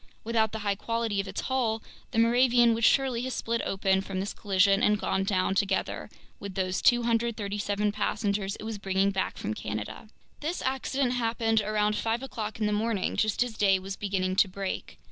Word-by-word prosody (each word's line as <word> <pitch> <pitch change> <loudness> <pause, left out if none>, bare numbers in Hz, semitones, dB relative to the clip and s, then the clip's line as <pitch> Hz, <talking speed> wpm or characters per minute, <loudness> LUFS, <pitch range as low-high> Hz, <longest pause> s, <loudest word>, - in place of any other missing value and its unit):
Without 220 -1 +1
the 220 - -4
high 200 - +2
quality 225 0 -1
of 195 - -9
its 190 - -4
hull, 230 -4 -1 0.3
the - - -5
Moravian 240 0 +5
would 230 +1 -2
surely 260 -1 +3
have 260 0 -3
split 230 0 -1
open 190 0 +1
from 195 -1 -4
this 195 +2 -3
collision 195 0 +3
and 210 0 +4
gone 190 - 0
down 190 -1 +1
together 195 0 -1 0.3
with 200 -2 -7
those 185 -1 -1
237 215 -4 +1
passengers 205 -1 -1
it - - -10
was 220 -1 -5
bringing 195 0 +1
back 190 -1 -2
from 105 - -3
Canada. 110 - -6 0.3
This 320 +4 -3
accident 265 0 0
happened 225 -2 +1
around 210 0 +1
five 230 +3 -1
o'clock 220 -5 -5
in 215 - +1
the 210 - +1
morning, 210 -2 0
just 215 +2 +2
as 245 -2 -6
day 195 -3 +4
was 190 +1 -6
beginning 190 -2 -1
to 200 - +5
break. 190 +1 -5
210 Hz, 185 wpm, -28 LUFS, 195-230 Hz, 0.3 s, Moravian